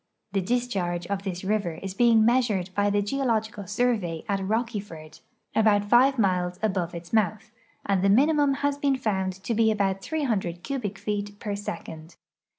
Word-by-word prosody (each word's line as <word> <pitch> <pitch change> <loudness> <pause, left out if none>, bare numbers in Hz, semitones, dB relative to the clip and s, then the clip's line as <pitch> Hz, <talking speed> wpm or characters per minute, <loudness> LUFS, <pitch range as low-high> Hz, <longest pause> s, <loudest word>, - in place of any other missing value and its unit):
The 195 0 0
discharge 185 -6 -1
of 200 +1 -2
this 185 -2 -5
river 200 -3 0
is 195 +2 -6
being 225 +1 +4
measured 225 -7 +1
by 205 +1 +2
the 205 0 +1
Geological 220 -4 -1
Survey 210 -6 -1
at 200 -2 0
Rocky 225 +2 -1
ford, 155 -6 -11 0.4
about 205 -2 +3
five 265 +3 +5
miles 180 -4 +1
above 185 -5 -1
its 170 +3 -9
mouth, 215 0 0 0.3
and 195 -2 +1
the 195 - +3
minimum 285 +5 +4
has 285 0 0
been 280 -1 +2
found 190 -6 -1
to 235 - -1
be 225 0 +3
about 195 -3 0
300 205 - -2
cubic 225 -8 -3
feet 205 0 -4
per 205 -2 -3
second. 165 -4 -7
205 Hz, 165 wpm, -26 LUFS, 190-235 Hz, 0.4 s, five